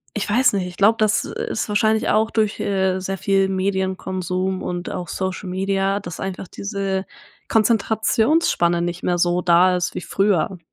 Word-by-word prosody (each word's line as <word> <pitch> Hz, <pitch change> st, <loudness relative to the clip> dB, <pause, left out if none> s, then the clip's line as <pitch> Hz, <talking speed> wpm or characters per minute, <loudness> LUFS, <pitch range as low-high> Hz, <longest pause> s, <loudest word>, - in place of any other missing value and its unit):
ich 210 Hz, 0 st, -2 dB
weiß 245 Hz, +2 st, +3 dB
nicht, 185 Hz, -2 st, -1 dB
ich 180 Hz, -, -10 dB
glaube, 215 Hz, +3 st, +4 dB
das 215 Hz, 0 st, +2 dB
ist 220 Hz, -, -3 dB
wahrscheinlich 215 Hz, +1 st, +2 dB
auch 220 Hz, +1 st, +2 dB
durch, 215 Hz, -2 st, 0 dB
äh, 190 Hz, -1 st, 0 dB
sehr 195 Hz, +1 st, -4 dB
viel 195 Hz, 0 st, +1 dB
Medienkonsum 190 Hz, -1 st, -2 dB
und 175 Hz, 0 st, -4 dB
auch 180 Hz, -1 st, -5 dB
Social 190 Hz, 0 st, -4 dB
Media, 195 Hz, +1 st, 0 dB
dass 175 Hz, -4 st, -8 dB
einfach 190 Hz, -1 st, -5 dB
diese 195 Hz, -2 st, -3 dB, 0.4 s
Konzentrationsspanne 220 Hz, -, +2 dB
nicht 175 Hz, 0 st, -3 dB
mehr 175 Hz, 0 st, +1 dB
so 175 Hz, +1 st, +1 dB
da 180 Hz, +1 st, +4 dB
ist 175 Hz, -, -3 dB
wie -, -, -3 dB
früher. 195 Hz, -2 st, 0 dB
190 Hz, 160 wpm, -21 LUFS, 180-205 Hz, 0.4 s, glaube